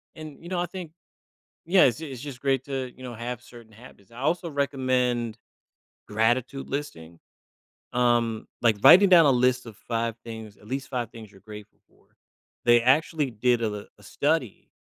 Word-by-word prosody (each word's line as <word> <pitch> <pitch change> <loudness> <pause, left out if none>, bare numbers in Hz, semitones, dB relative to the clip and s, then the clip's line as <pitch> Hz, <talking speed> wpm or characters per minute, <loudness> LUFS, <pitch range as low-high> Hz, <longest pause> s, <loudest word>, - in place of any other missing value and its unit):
And, 155 -2 -10
you 170 - -10
know, 185 -1 -1
I 175 - 0
think 175 -2 -8 0.7
yeah, 180 +2 +5
it's 125 +2 +2
it's 135 -6 -7
just 140 -3 -8
great 135 -2 0
to, 135 -2 -4
you 130 - -13
know, 125 -1 -6
have 120 +1 -6
certain 120 -3 -15
habits. 110 -3 -17
I 115 - -11
also 165 +5 -1
recommend 130 -5 0 0.7
gratitude 120 +5 0
listing, 85 - -6 0.7
um, 120 -2 +1 0.2
like, 115 -3 +4
writing 195 +2 +9
down 170 -4 +8
a - - +6
list 125 0 +2
of 110 -3 -10
5 115 -1 -2
things, 110 -2 -9
at 105 - -19
least 135 +4 -4
5 120 -4 -3
things 115 -3 -12
you're 100 -2 -19
grateful 105 0 -12
for. - - -30 0.6
They 120 -1 +5
actually 145 +2 +2
did 120 +1 +1
a - - +1
l 105 -1 -5
a - - -19
study 140 +2 -2
125 Hz, 180 wpm, -26 LUFS, 115-140 Hz, 0.7 s, writing